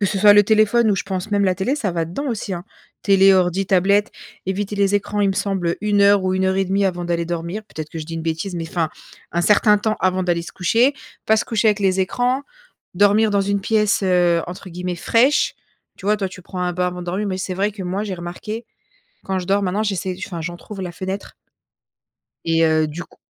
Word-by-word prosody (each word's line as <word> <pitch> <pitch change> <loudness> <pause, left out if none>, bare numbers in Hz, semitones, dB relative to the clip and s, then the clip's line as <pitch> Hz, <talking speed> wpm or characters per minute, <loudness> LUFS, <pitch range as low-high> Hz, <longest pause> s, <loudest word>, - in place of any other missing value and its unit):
que 200 - +2
ce 195 +1 -1
soit 205 +1 +7
le 205 - +7
téléphone 215 +2 +3
ou, - - +3
je - - -1
pense, 190 +1 -4
même 200 -1 +2
la 185 -1 +2
télé, 195 +10 -1
ça 230 -10 -2
va 170 -1 -1
dedans 190 - -4
aussi, 215 -4 -3
hein. 175 -1 -5 0.4
Télé, 195 -1 +5
ordis, 185 +1 +1
tablettes, 200 +3 +3 0.4
éviter 200 +2 -2
les 200 0 +2
écrans, 205 0 -1
il 200 - +3
me 195 - 0
semble, 190 -4 -1
heu - - -2
1 205 -1 +1
heure 200 -1 +5
ou 185 - +1
1,5 190 +1 +1
avant 175 -1 -2
d'aller 170 -1 -1
dormir. 170 +5 -4
Peut-être 155 -6 -8
que 165 - -6
je 155 - -6
dis 165 - -6
une 165 - -4
bêtise, 165 +4 -3
mais 165 -1 -4
enfin, 165 -2 -1 0.4
un 170 - +1
certain 210 +2 +5
temps 215 +1 -1
avant 185 0 +1
d'aller 175 -1 0
se - - -10
coucher, 230 +10 +2 0.3
pas 220 - +4
se - - 0
coucher 225 -1 +1
avec 210 -1 +1
les 190 -1 +2
écrans, 245 +8 0 0.5
dormir 205 +3 +4
dans 200 -1 +2
une 200 0 0
pièce, 210 0 +1
heu, 175 -2 +3
entre 180 +2 -8
guillemets 180 +1 -4
«fraîche», 245 +10 +2 0.4
tu 190 - -9
vois. 210 +1 +3
Toi, 195 -2 -2
tu 185 - -11
prends 180 +1 -7
un 180 0 -1
bain 180 +1 0
avant 180 0 -4
de 175 - -8
dormir, 190 +4 -2
mais 185 -2 -2
c'est 185 0 -3
vrai 200 +3 0
que, 195 - -7
moi, 190 +3 -2
j'ai 200 -3 -4
remarqué, 180 +6 -6 0.6
quand 190 -1 -2
je 180 - -6
dors, 200 +2 +2
maintenant, 195 +3 0
j'essaie 190 -3 -2
enfin, 170 -3 -6
j'entrouvre 175 +4 -7
la 180 -2 -4
fenêtre 190 +3 -6 1.1
et 165 0 +1
heu, 155 -1 +3
du 160 +4 -6
coup - - -23
190 Hz, 235 wpm, -20 LUFS, 180-205 Hz, 1.1 s, soit